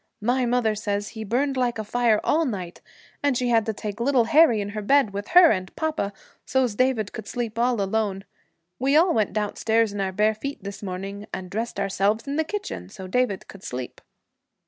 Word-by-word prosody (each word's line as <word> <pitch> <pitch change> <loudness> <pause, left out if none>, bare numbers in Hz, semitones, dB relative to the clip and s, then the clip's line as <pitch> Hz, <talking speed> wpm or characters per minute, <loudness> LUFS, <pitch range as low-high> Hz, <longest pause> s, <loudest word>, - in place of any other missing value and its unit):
My 250 +2 +2
mother 235 -2 +2
says 205 -1 -2
he 220 -1 -7
burned 265 +6 0
like 245 -2 0
a 220 - -3
fire 225 0 +2
all 320 +2 +2
night, 190 - -4 0.4
and 285 -3 +2
she 250 0 0
had 230 -2 +3
to 220 - 0
take 210 +1 -6
little 255 0 +3
Harry 245 -2 +5
in 205 0 -3
her 210 +1 -4
bed, 265 -1 +3
with 200 +1 -4
her 350 -1 +7
and 185 -1 -3
papa, 310 -10 -1 0.3
so's 260 -4 +1
David 235 -3 +1
could 220 - -7
sleep 230 -2 -4
all 240 -1 +2
alone. 195 -1 -1 0.5
We 275 +2 +2
all 340 +2 +4
went 215 -3 +1
downstairs 220 +1 0
in 205 - -3
our 190 -1 -1
bare 210 +3 +2
feet 255 +1 -6
this 200 0 -7
morning, 195 +1 -6
and 185 -1 -6
dressed 225 +3 -3
ourselves 200 +2 0
in 280 0 -3
the 320 - +2
kitchen, 315 - -5
so 190 - -9
David 205 0 0
could 195 - -12
sleep.' 125 -5 -6
220 Hz, 205 wpm, -24 LUFS, 200-255 Hz, 0.5 s, her